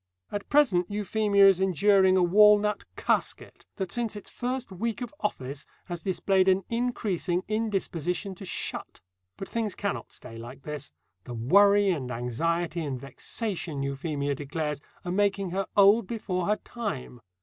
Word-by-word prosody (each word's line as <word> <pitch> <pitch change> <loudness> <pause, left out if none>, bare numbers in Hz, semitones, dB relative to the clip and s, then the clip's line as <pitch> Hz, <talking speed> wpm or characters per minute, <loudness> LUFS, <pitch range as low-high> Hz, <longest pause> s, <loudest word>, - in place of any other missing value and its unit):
At 205 -1 -5
present 225 -12 +3
Euphemia 205 -1 +3
is 190 -2 +5
enduring 190 +1 +4
a 185 - +4
walnut 210 +3 +5
"casket," - - -2
that 190 -3 -4
since 235 -3 -1
its 205 - -8
first 250 -2 -3
week 220 +4 -3
of 245 +3 -6
office 140 -8 -4 0.2
has 175 -2 -6
displayed 190 0 +1
an 190 0 +4
increasing 210 -7 -1
indisposition 195 -4 -2
to 185 - -11
shut. 190 - -4 0.4
But 195 - -6
things 225 -4 -2
cannot 200 -2 -3
stay 115 -2 -10
like 125 +4 -10
this. 150 -2 -6 0.3
The 120 - -6
worry 200 - +5
and 135 -8 -3
anxiety 165 +8 -1
and 135 -4 -3
vexation, 155 - -4
Euphemia 140 +1 -2
declares, 150 +1 -3 0.2
are 175 - -2
making 195 -1 +1
her 195 +1 -1
old 200 +1 +6
before 185 -6 -2
her 210 - +3
time. 195 - -6
190 Hz, 150 wpm, -27 LUFS, 155-210 Hz, 0.4 s, old